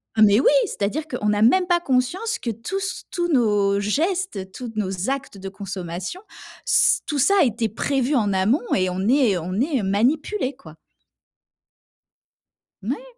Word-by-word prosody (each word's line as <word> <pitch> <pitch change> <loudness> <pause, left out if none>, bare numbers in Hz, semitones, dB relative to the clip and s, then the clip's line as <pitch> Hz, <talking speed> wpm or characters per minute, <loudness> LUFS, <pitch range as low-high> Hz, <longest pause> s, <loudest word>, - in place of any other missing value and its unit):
Ah 220 - +1
mais 205 0 +6
oui! - - +2 0.2
...c'est-à-dire 290 +11 -3
qu'on 210 -4 -1
a 205 - 0
même 360 +12 +4
pas 350 -1 +2
conscience 345 - -1
que 235 - -3
tous 230 - -5
s 380 -1 -4
tous 345 -1 -1
nos 205 -5 +2
gestes, 285 - -2
toutes 230 -2 -8
nos 190 +1 -2
actes 270 -6 -4
de 195 0 -7
consommation, 190 - -6 0.4
s - - +4
tout 295 - -2
ça 395 +10 +4
a - - +5
été 230 -1 -1
prévu 270 +5 -1
en 210 -5 +1
amont 210 +9 +1
et 185 -1 +1
on 180 +1 -3
est 250 -9 +3
on 175 +2 -5
est 270 -5 0
manipulés, 260 - 0
quoi. 160 - -14 2.1
Moui! - - -4
235 Hz, 165 wpm, -22 LUFS, 200-295 Hz, 2.1 s, mais